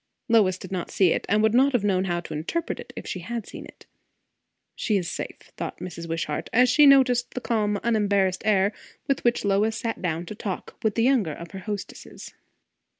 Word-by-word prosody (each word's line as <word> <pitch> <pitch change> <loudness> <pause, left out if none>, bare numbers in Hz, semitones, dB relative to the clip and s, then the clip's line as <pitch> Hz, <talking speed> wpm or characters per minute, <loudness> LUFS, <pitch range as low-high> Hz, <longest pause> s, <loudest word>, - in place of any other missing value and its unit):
Lois 210 -6 +4
did 185 0 -10
not 180 -3 -3
see 185 -4 +3
it, - - -3
and 210 +1 +3
would 220 0 +3
not 270 +3 +4
have 240 -5 +2
known 190 -2 +1
how 175 -2 -1
to 170 - -8
interpret 175 - -3
it - - -9
if - - -7
she 185 - -4
had 225 +4 -5
seen - - -9
it. - - -16 0.9
She 215 -3 0
is 180 -3 -2
safe, - - -7
thought - - -5
Mrs. 170 -2 -7
Wishart, 165 -2 -3
as 250 +2 +5
she 295 +3 +6
noticed 255 -3 +4
the - - -1
calm 210 -4 0
unembarrassed 200 -5 +1
air 200 -1 +2 0.3
with 275 - 0
which 240 -3 +1
Lois 210 +3 +2
sat 230 -2 -3
down 170 -2 -2
to 195 - -7
talk 205 -3 -6
with 220 -4 0
the 230 - +2
younger 235 - +2
of 170 +2 -9
her 195 - -7
hostesses. 205 0 -7
205 Hz, 210 wpm, -25 LUFS, 185-235 Hz, 0.9 s, she